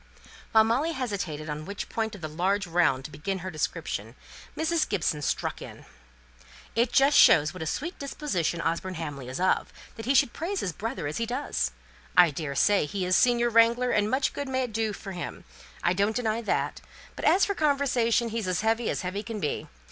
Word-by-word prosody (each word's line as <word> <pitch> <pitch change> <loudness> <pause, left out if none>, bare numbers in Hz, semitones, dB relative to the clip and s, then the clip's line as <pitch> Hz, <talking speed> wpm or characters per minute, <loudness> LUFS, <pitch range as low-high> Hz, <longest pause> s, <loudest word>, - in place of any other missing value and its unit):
While 220 -1 +6
Molly 260 +9 +1
hesitated 195 - -3
on 150 0 -4
which 200 0 -5
point 220 -2 -2
of 200 - -12
the 155 - -3
large 190 +6 0
round 165 -7 +2
to 155 - -7
begin 170 +7 -3
her 185 - -3
description, 155 -2 -3 0.4
Mrs. 320 0 +1
Gibson 160 -6 0
struck - - -2
in, - - -10 0.9
"It 235 +1 +2
just 275 +3 +4
shows 155 0 +6
what 185 - -8
a 160 - -3
sweet 335 - -3
disposition 190 - -2
Osborne 170 +3 -2
Hamley 145 -6 -6
is 130 - -5
of 185 +1 +1 0.3
that 225 0 -7
he 275 - +3
should 240 - +4
praise 375 +4 -3
his 180 - -2
brother 225 - -4
as 145 - -3
he 230 - -1
does. 245 - -1 0.5
I 175 -3 +7
daresay 150 +5 +1
he 190 +2 -3
is 185 0 +2
a - - +5
senior 240 -1 +3
wrangler, 235 +2 +4
and 210 0 +2
much 265 +2 +1
good 285 - -4
may 260 0 0
it 240 -3 -5
do 220 0 0
him! 195 -3 -7 0.4
I 175 - +3
don't 200 +3 +1
deny 230 -2 0
that; 225 - -1 0.3
but - - -7
as 385 - +5
for 400 - -1
conversation, 270 - +2
he's 225 -3 -3
as 185 -2 0
heavy 225 +1 +1
as - - -2
heavy 185 +2 -3
can 220 -1 -6
be. 150 - -2
210 Hz, 200 wpm, -27 LUFS, 170-245 Hz, 0.9 s, I